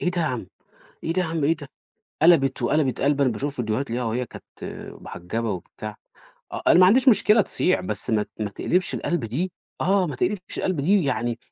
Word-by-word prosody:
إيه 180 - 0
ده 175 -1 -2
يا 160 - +1
عم، - - -3 0.6
إيه 165 - -1
ده 185 - +1
يا 170 - -2
عم، 160 -2 -2
إيه 160 +4 +2
ده؟ 145 -3 -10 0.6
قلبِت 160 -5 +4
وقلبِت 150 -4 0
قلبة 140 0 +2
أنا 125 - +1
باشوف 140 +6 -4
فيديوهات 120 +2 -2
ليها 120 +1 -2
وهي 120 +2 -2
كانت - - -12 0.6
محجبة 110 +6 -4
وبتاع 105 +3 -7 0.6
آه، - - -5
أنا - - +6
ما 180 - +8
عنديش 255 +7 +5
مشكلة 210 0 +6
تصيع، 185 -2 +1
بس 185 - +3
ما 110 -1 +2
ت - - -32
ما 105 -1 -2
تقلبش 180 - +1
القلبة 160 -10 -2
دي، 170 +10 -2 0.3
آه، 190 -1 +2
ما 145 - -5
تقلبش 185 0 -1
القلبة 180 -7 -1
دي، 190 +3 +3
يعني 120 -3 -1
145 Hz, 210 wpm, -23 LUFS, 120-180 Hz, 0.6 s, ما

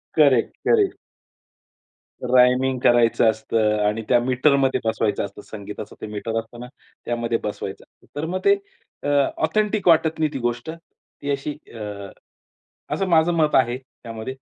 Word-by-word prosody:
Correct, - - +4
correct. 415 -4 +3 1.4
Rhyming 125 +1 +4
करायचं 115 -1 +4
असतं 110 -1 0
आणि 110 +2 -1
त्या 120 -1 +5
मीटरमध्ये 135 +2 +2
बसवायचं 110 -2 0
असतं. 105 - -10
संगीताचं 105 0 -9
ते - - -5
मीटर 110 +2 -3
असत 115 +1 -10
ना 125 - -7 0.4
त्यामध्ये 115 -1 -1
बसवायचं 100 -2 -5
असतं. - - -28
तर 160 - -2
मग 185 +3 -2
ते 400 0 +6 0.5
अ, 145 - -1 0.3
ऑथेंटिक 210 -3 0
वाटत 160 -1 +4
नाही 155 -1 +1
ती 135 - -3
गोष्ट 120 +4 -2
ती 165 -3 -12
अशी 140 +2 -2 0.2
अ, 105 -3 -7 0.8
असं 195 - -1
माझं 170 0 +3
मत 155 -2 +2
आहे 125 -1 +3
त्यामध्ये. 125 -2 -9
125 Hz, 145 wpm, -22 LUFS, 110-155 Hz, 1.4 s, ते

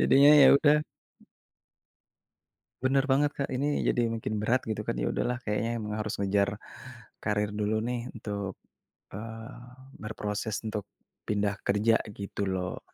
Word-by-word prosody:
Jadinya 140 +2 +7
ya - - +9
udah. 150 +1 +4 2.0
Bener 135 +1 +2
banget, 145 +2 +3
Kak, 140 - -3
ini 145 +3 0
jadi 120 -1 +2
makin 110 -1 -3
berat 115 +4 0
gitu 110 - -2
kan. - - -2
Ya - - 0
udahlah 125 +1 -1
kayaknya 115 +2 -1
emang 105 -1 -4
harus 105 -1 -3
ngejar, 100 +1 +1 0.6
karir 105 -1 -1
dulu 105 +1 -1
nih 120 +1 -3
untuk, 100 -3 -4 0.6
eee, 115 +4 -7 0.5
berproses 105 0 -4
untuk 105 -2 -4 0.4
pindah 100 -1 0
kerja 105 +3 +3
gitu 100 -1 -4
loh. 90 -1 -3
110 Hz, 135 wpm, -29 LUFS, 105-120 Hz, 2.0 s, ya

